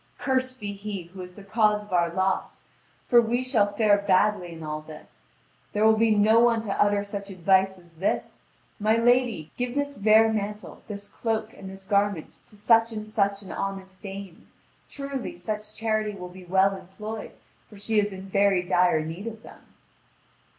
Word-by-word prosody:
Cursed 260 -1 -1
be 205 -2 -4
he 200 -2 -6
who 190 - -8
is 180 0 -10
the 205 - -11
cause 210 0 +2
of 205 -2 -10
our 170 -1 +2
loss! 190 +2 -1 0.4
For 240 -2 +6
we 240 +2 0
shall 220 -6 +2
fare 205 -2 +4
badly 200 -2 +2
in 165 -1 -9
all 155 0 -4
this. 155 0 -14 0.5
There 210 +1 +2
will 220 0 +6
be 225 +1 +3
no 215 +1 +5
one 235 -1 +4
to 205 -3 -2
utter 205 0 +3
such 200 0 -6
advice 190 +1 +2
as 175 -2 -19
this: 190 - -2 0.4
'My 215 +2 +3
lady, 235 -8 +2
give 245 0 -2
this 285 0 -2
vair 220 +2 +5
mantle, 210 0 -4
this 200 -1 -7
cloak, 220 0 -3
and 190 - -10
this 190 0 -11
garment 200 -4 0
to 210 - -14
such 225 +2 +4
and 215 -1 -6
such 200 -1 0
an 185 - -9
honest 190 -1 -5
dame! 195 -3 -9 0.4
Truly, 275 +4 -5
such 215 -3 -5
charity 215 -2 -1
will 180 -1 -7
be 180 0 -12
well 190 +2 +3
employed, 210 +4 -8 0.4
for 210 - -14
she 210 +2 +1
is 205 0 0
in 190 0 -8
very 195 -1 +2
dire 180 -3 +3
need 170 +7 -6
of 225 -1 -7
them.' - - -14
205 Hz, 185 wpm, -26 LUFS, 190-220 Hz, 0.5 s, For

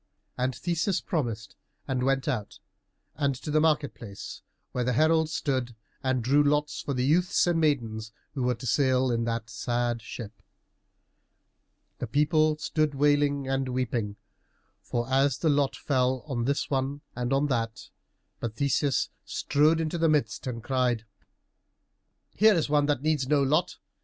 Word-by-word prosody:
And 125 0 -1
Theseus 170 +7 0
promised, 115 - -3 0.3
and 130 -1 -1
went 135 0 +1
out, 120 -8 -2 0.6
and 140 -3 0
to 150 +4 -6
the 155 +1 +3
market 150 -3 +2
place, 100 -5 -9 0.3
where 125 - -1
the 125 +1 0
herald 160 +4 +3
stood 130 -6 -2 0.3
and 130 -3 0
drew 140 +5 +4
lots 150 +1 +1
for 140 - -3
the 125 0 0
youths 175 +6 +3
and 175 -2 +2
maidens 115 -8 0 0.2
who 135 - -3
were 125 0 +1
to 120 - -9
sail 130 +1 +2
in 115 -1 0
that 115 -1 -3
sad 120 -1 -1
ship. 110 -1 -9 1.6
The - - -3
people 155 +1 +2
stood 155 -1 0
wailing 145 -1 +2
and 135 0 -1
weeping 120 -5 -2 0.8
as 130 +3 +2
the 160 - +1
lot 140 -2 +2
fell 130 -2 0
on 125 -6 -2
this 140 +2 0
one 135 +1 -1
and 125 0 -2
on 135 +2 +3
that, 115 -3 -2 0.5
but 115 -2 -4
Theseus 140 0 +1
strode 150 +3 +2
into 160 +1 -2
the 165 0 +3
midst 150 -3 0
and 115 -3 -4
cried, 125 -3 0 1.3
"Here 215 0 +5
is 160 -3 0
one 145 -1 +3
who 145 - +3
needs 145 -1 0
no 145 0 +3
lot. 140 +3 +1
135 Hz, 155 wpm, -27 LUFS, 125-150 Hz, 1.6 s, Here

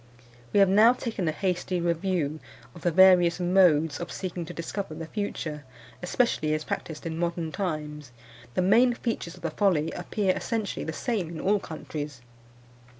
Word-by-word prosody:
We - - +3
have 195 - +7
now 215 +5 +6
taken 225 -8 -3
a - - +2
hasty 180 +2 -1
review 170 -3 -1 0.3
of 170 - -12
the 175 - +2
various 180 0 +6
modes 175 -5 +3
of 175 - -5
seeking 180 -2 -4
to - - -8
discover 170 0 -5
the 165 +1 -6
future, 160 -6 -4 0.4
especially 180 -5 +1
as 155 - -3
practised 155 0 -5
in 165 0 -4
modern 170 -2 -2
times. 150 -6 -4 0.4
The 185 - +2
main 235 +6 +5
features 225 -8 -3
of - - -17
the 165 - -1
folly 165 -4 +1
appear 185 +2 -1
essentially 225 -4 -3
the 160 - -3
same 195 0 -2
in 165 -2 -7
all 205 +2 +2
countries. 150 -5 -7
175 Hz, 165 wpm, -27 LUFS, 160-195 Hz, 0.4 s, have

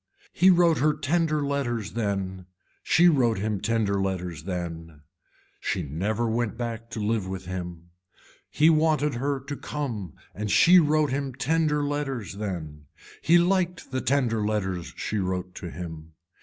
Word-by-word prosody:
He 185 - +5
wrote 170 -3 +5
her 150 +1 +3
tender 155 0 0
letters 120 -9 -2
then, 95 -3 -3 0.3
she 175 +1 +4
wrote 125 -9 +3
him 105 0 -2
tender 105 -4 +1
letters 90 -5 -3
then, 85 -4 -5 0.6
she - - -2
never 100 - -1
went 115 0 -1
back 115 -1 -5
to 110 - -6
live 105 -2 0
with 95 -1 -5
him. 90 -2 -6 0.6
He 150 - +3
wanted 155 -2 +3
her 140 +3 -1
to 145 +2 -6
come 115 - -5 0.2
and 105 +1 -4
she 180 - +7
wrote 155 -2 +2
him 135 -2 -2
tender 150 +2 +1
letters 135 -8 -3
then. 80 -8 -5 0.4
He 170 - +5
liked 180 -3 +1
the 130 0 -1
tender 120 -5 +1
letters 95 -5 -2
she 110 - -2
wrote 90 -1 -2
to - - -7
him. 80 0 -8
115 Hz, 150 wpm, -26 LUFS, 95-145 Hz, 0.6 s, she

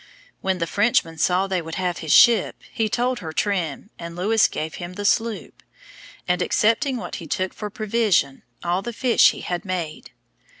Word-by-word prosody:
When 190 -1 0
the 170 - -1
Frenchman 170 -5 +1
saw 180 +3 +2
they 190 -2 -1
would 165 0 -7
have 180 -2 -2
his 160 -3 -3
ship, 235 -5 +5
he 220 -1 0
told 245 +2 0
her 160 -4 -6
trim, 185 0 -2
and 170 0 -7
Lewis 210 +5 +3
gave 160 +1 -5
him 175 +1 -6
the 205 +2 -5
sloop; 225 +1 -1 0.7
and 180 0 +1
excepting 230 +5 +1
what 230 - -6
he 165 - -9
took 185 +4 -2
for 210 - -6
provision, 215 - 0 0.2
all 175 +2 0
the 240 +3 -6
fish 245 +1 +4
he - - -6
had 175 -1 -3
made. 175 -5 -5
190 Hz, 180 wpm, -23 LUFS, 175-220 Hz, 0.7 s, ship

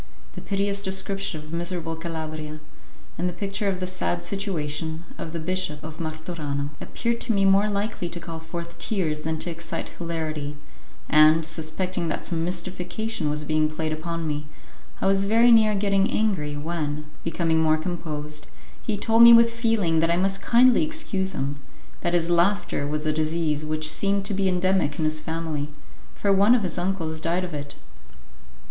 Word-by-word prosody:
The - - -8
piteous 200 0 0
description 195 -3 -2
of 155 +1 -11
miserable 170 -1 -2
Calabria, 155 -2 -5 0.6
and 180 +1 +1
the - - -5
picture 200 +3 -2
of 190 -2 0
the 185 - -2
sad 85 - -2
situation 160 - -3 0.2
of 160 - -5
the 165 - -4
Bishop 180 -3 -2
of 160 0 -8
Martorano, 155 -3 -4
appeared 235 0 -2
to 240 - +2
me 195 -1 +3
more 195 +2 +4
likely 200 -3 -2
to 175 - -6
call 165 -1 -7
forth 170 +1 -7
tears 160 -8 0
than 160 +1 -2
to 170 +2 -2
excite 165 0 -4
hilarity, 155 -4 -4 0.5
and, 155 +1 +6
suspecting 170 +3 -2
that 155 - -3
some 165 -2 -1
mystification 180 +1 -2
was 150 0 -1
being 155 0 +1
played 155 0 -2
upon 165 +1 -4
me, 150 -1 -3 0.5
I - - 0
was 195 0 +3
very 230 +4 +5
near 220 -2 +6
getting 200 -1 +2
angry 165 -10 0
when, 150 -1 -3 0.2
becoming 165 -1 +1
more 155 0 +4
composed, 155 -3 -5 0.3
he 210 - -2
told 225 +3 +3
me 235 0 +11
with 230 0 +6
feeling 225 -8 +2
that 165 +1 +2
I 170 - +3
must 195 +1 +1
kindly 245 +4 +5
excuse 305 -12 -1
him; 140 +1 -3 0.4
that 175 -1 +1
his 165 -1 +2
laughter 175 -4 +2
was 150 +1 -2
a 155 - +2
disease 155 -1 0
which 155 0 -1
seemed 200 +2 0
to 200 - -1
be 195 -1 +1
endemic 185 -4 +1
in 160 - 0
his 155 0 0
family, 160 -2 -3 0.5
for 200 -1 +2
one 200 +5 +6
of 230 - +1
his 175 -1 -2
uncles 170 -4 -2
died 170 +3 0
of 175 - -8
it. 145 -1 -5
170 Hz, 175 wpm, -25 LUFS, 155-195 Hz, 0.6 s, me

